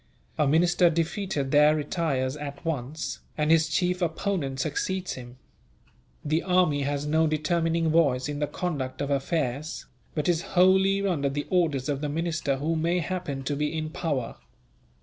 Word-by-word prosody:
A 150 - +2
minister 175 +4 +4
defeated 165 -3 -1
there 150 +1 +6
retires 145 -4 -1
at 145 0 -7
once, 155 0 -3 0.2
and 150 0 +2
his 160 -1 +4
chief 180 +3 0
opponent 165 -5 -1
succeeds 180 +6 -2
him. 125 0 -10 0.9
The 155 +2 +1
army 180 -6 +2
has 140 +1 -1
no 160 +2 +2
determining 165 +1 +1
voice 140 -6 +3
in 145 -1 -4
the 150 - 0
conduct 145 -5 -3
of 140 0 -2
affairs, 140 0 -2 0.3
but 150 -2 -1
is 170 -2 +2 0.2
wholly 190 +2 +4
under 150 -8 +1
the 145 +1 -3
orders 155 -8 +1
of 145 -2 -1
the 150 - -2
minister 155 -2 -1
who 155 +4 -1
may 170 +3 +1
happen 170 -5 -3
to 145 +2 -2
be 150 +2 -1
in 155 0 -3
power. 145 - -2
155 Hz, 160 wpm, -26 LUFS, 140-170 Hz, 0.9 s, there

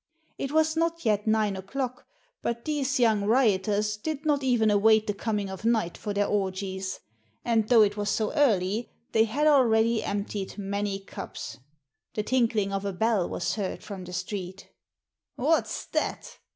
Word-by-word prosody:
It 275 - -3
was 315 +1 +2
not 335 -2 -1
yet 210 -1 +1
nine 215 -2 +2
o'clock, 250 +7 -4 0.3
but 235 0 -3
these 280 -3 0
young 220 -4 +3
rioters 210 -2 +2
did 305 +6 -4
not 290 -2 +2
even 240 -5 +3
await 215 +1 +4
the 205 - -1
coming 205 -1 -2
of 190 +1 -8
night 225 -7 +1
for 210 - -5
their 205 0 +1
orgies; 190 -1 -2 0.4
and 225 -2 +1
though 230 -3 +7
it 205 0 0
was 205 0 -1
so 215 +3 0
early, 220 -6 +2 0.2
they 220 0 +4
had 275 +8 0
already 230 -6 +4
emptied 200 -1 -3
many 200 0 -2
cups. 125 -10 -8 0.6
The 210 - -1
tinkling 225 -5 +1
of 195 0 -2
a 200 -1 -2
bell 215 -1 +1
was 175 - -2
heard 200 -4 -4
from 195 -3 -7
the 180 - -9
street. 185 0 -5 0.6
"What's 310 +6 0
that?" - - -3
215 Hz, 165 wpm, -27 LUFS, 200-245 Hz, 0.6 s, though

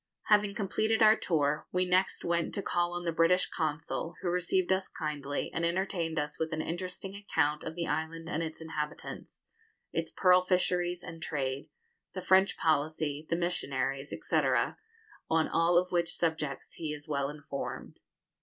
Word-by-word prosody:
Having 210 -1 +4
completed 220 +2 +1
our 215 0 +8
tour, 150 -5 0
we 180 0 +2
next 185 +1 +1
went 170 -1 0
to 200 - -2
call 175 0 0
on 175 0 -3
the 170 - +1
British 165 +3 +4
Consul, 160 +2 -2
who 180 - +1
received 180 +1 +1
us 190 0 0
kindly, 145 -3 -3
and 165 - -1
entertained 170 -1 0
us 150 0 -2
with 160 0 -1
an 155 - -2
interesting 180 +4 -4
account 160 -7 0
of 160 - -5
the 170 -1 -2
island 165 +1 -2
and 165 -1 -1
its 160 0 -5
inhabitants, 155 -2 -6 0.5
its - - -1
pearl 180 -1 +5
fisheries 180 -1 +1
and 165 -2 -8
trade, 140 -3 -2 0.4
the 185 - -4
French 190 +1 +4
policy, 155 -1 0
the - - +2
missionaries, 135 -5 -1
&c., - - -1 0.9
on 160 0 +3
all 170 +1 +3
of 180 +1 +2
which 170 -2 +1
subjects 155 -5 -2
he 155 -2 -4
is 150 -1 -7
well 140 -2 0
informed. 145 -2 -6
165 Hz, 165 wpm, -31 LUFS, 150-180 Hz, 0.9 s, our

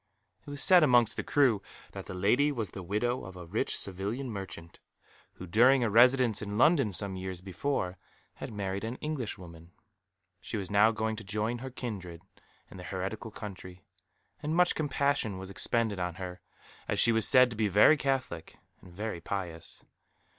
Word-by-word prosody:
It - - -7
was 145 0 -2
said 180 -2 +7
amongst 120 -6 +4
the - - -2
crew 130 -8 +2 0.3
that - - -8
the - - -6
lady 120 +11 +2
was 110 -9 -4
the 95 - -7
widow 105 +7 -1
of 95 -1 -10
a 90 - -9
rich 95 +7 0
Sevillian 105 +7 -3
merchant, 95 -5 -8 0.5
who 90 - -9
during 120 +8 +4
a 115 - 0
residence 125 0 +5
in 105 -1 -4
London 140 -4 +4
some 100 +1 0
years 95 -1 -5
before 95 0 -3 0.4
had - - -7
married 100 -1 -4
an 115 +2 -4
Englishwoman. 95 - -6 0.7
She 110 - -5
was 95 -2 -5
now 105 +2 +5
going 110 0 -2
to 115 - -8
join 110 +3 -2
her 130 +2 -6
kindred 95 -9 -7 0.5
in - - -11
the 90 - -9
heretical 95 +5 -5
country, 90 -4 -9 0.6
and 155 +1 -2
much 180 0 +4
compassion 140 -8 0
was 95 +1 -7
expended 110 0 0
on 90 -1 -3
her, 90 -1 -7 0.5
as - - -1
she 115 - +5
was 110 -2 +2
said 125 -2 +6
to - - -6
be 110 0 +1
very 105 - +6
Catholic 130 - -3 0.2
and 90 - -15
very 100 -1 -5
pious. 85 -3 -5
105 Hz, 175 wpm, -30 LUFS, 95-125 Hz, 0.7 s, said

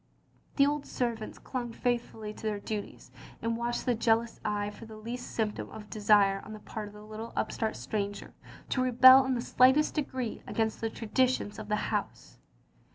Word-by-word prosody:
The 280 - +5
old 290 0 -1
servants 230 -3 -3
clung 245 -3 -5
faithfully 230 -3 -2
to - - -13
their 210 -1 -1
duties, 210 0 -6 0.3
and 230 0 -1
watched 235 +1 -2
with 245 -3 +1
jealous 230 0 +2
eyes 210 -1 -1
for 225 - -11
the 220 -1 -10
least 235 +3 -6
symptom 215 -2 -2
of 220 - -9
a 210 - -20
desire 200 -1 +4
on 215 - -9
the 215 - -8
part 210 0 -6
of 205 - -13
the 210 - -11
little 215 +2 -7
upstart 220 -1 -1
stranger 205 -1 -4 0.4
to 255 - +1
rebel 255 +1 +8
in 260 -1 +1
the 235 - -1
slightest 260 +5 +4
degree 260 -6 -3
against 220 -1 -1
the 225 - 0
traditions 225 -1 0
of 215 - -7
the 210 - +1 0.2
house. - - -4
225 Hz, 185 wpm, -30 LUFS, 210-245 Hz, 0.4 s, rebel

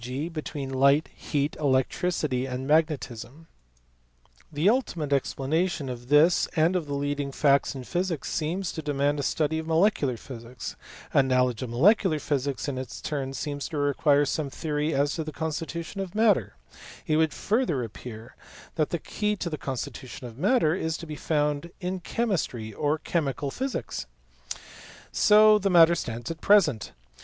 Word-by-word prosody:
g. 130 +6 -4
between 150 -4 -5
light, 140 +3 +4
heat, 145 -1 -2
electricity, 135 0 0
and 130 0 -4
magnetism. 150 -2 0 1.1
The 155 +4 +1
ultimate 175 - +1
explanation 145 +3 0
of 120 -1 -7
this 155 +4 +5
and 165 +3 +3
of 170 -4 -1
the 145 - -3
leading 145 0 -2
facts 140 0 +2
in 130 - -6
physics 175 0 -2
seems 170 +4 -2
to 160 - -5
demand 145 -1 0
a - - 0
study 155 +2 0
of 160 - -6
molecular 160 - +2
physics; 120 +1 -8 0.4
a - - +6
knowledge 130 -2 +1
of 130 - -4
molecular 170 - +4
physics 140 -2 -2
in 135 -3 -2
its 130 - -7
turn 135 -3 -3
seems 145 0 -4
to 160 - -4
require 145 0 +3
some 145 +1 -2
theory 150 +1 -2
as 140 0 +1
to 160 - -3
the 155 - -6
constitution 165 +4 -4
of 190 0 -6
matter; 210 - +3 0.5
it 155 - +2
would 160 -1 +3
further 205 - 0
appear 115 +2 -9 0.4
that 155 -2 +1
the 170 - -1
key 210 +6 -2
to 180 -4 -4
the - - -1
constitu 130 0 -5
tion 125 - -9
of 115 -2 -9
matter 185 - +3
is 160 -2 -2
to - - -8
be 155 -1 -6
found 150 +1 -1
in 185 0 -3
chemistry 165 - -2
or 150 +6 0
chemical 145 -4 -2
physics. 190 - -4 1.0
So 215 0 +6
the 195 0 0
matter 170 -2 +7
stands 120 -5 -4
at 165 - -8
present. 160 - +3
150 Hz, 165 wpm, -26 LUFS, 135-170 Hz, 1.1 s, matter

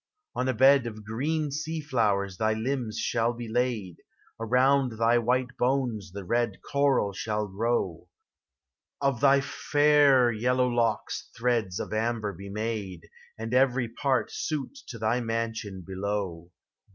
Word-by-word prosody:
On 130 - -1
a 130 - +1
bed 135 +1 +5
of 110 -2 -8
green 145 +7 -1 0.2
Ben 160 0 -3
flowers 100 -9 0
thy 110 0 +1
limbs 115 0 -2
shall 120 0 0
be 120 0 -7
laid, 110 -6 -1 0.2
— - - -34
Around 125 +2 +3
thy 115 +2 +3
white 125 +2 0
bones 120 -6 0
the 100 +1 -7
red 115 +1 0
coral 140 -8 +1
shall 105 +1 -2
grow; 95 -4 -2 0.9
Of 140 -3 0
thy 140 0 +5
fair 145 -3 +4
yellow 125 +3 +1
locks 115 -3 -1
threads 115 -6 0
of - - -5
amber 110 -1 -1
be 100 +1 -9
made 105 -4 -4 0.3
And 115 +1 -5
everj 125 -2 +2
pari 135 0 +1
suit 155 - -4
to 115 - -7
thy 115 +2 +1
mansion 115 -4 -3
below. 95 -3 -4
115 Hz, 140 wpm, -27 LUFS, 105-130 Hz, 0.9 s, bed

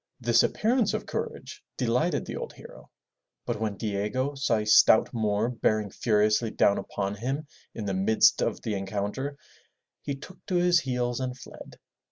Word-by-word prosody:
This - - +4
appearance 230 -1 +1
of - - -4
courage - - -6
delighted - - 0
the - - -6
old 480 -1 -6
hero, - - -14 0.6
but 120 -3 -3
when 105 -3 -2
Diego 110 +6 -2
saw 135 -4 0
a 105 - -2
stout 105 +1 +5
Moor 110 0 0
bearing 110 -4 0
furiously 110 0 +2
down 100 - +2
upon 100 -1 -3
him 135 +8 -3 0.3
in 110 - -5
the 100 - -1
midst 95 +4 +3
of - - -2
the 110 - -2
encounter, 105 +8 -3 0.6
he 140 - -4
took 165 +7 -13
to 185 - -1
his 175 0 +4
heels 125 -4 -2
and 130 -1 -3
fled. 130 - -12
115 Hz, 165 wpm, -27 LUFS, 105-140 Hz, 0.6 s, stout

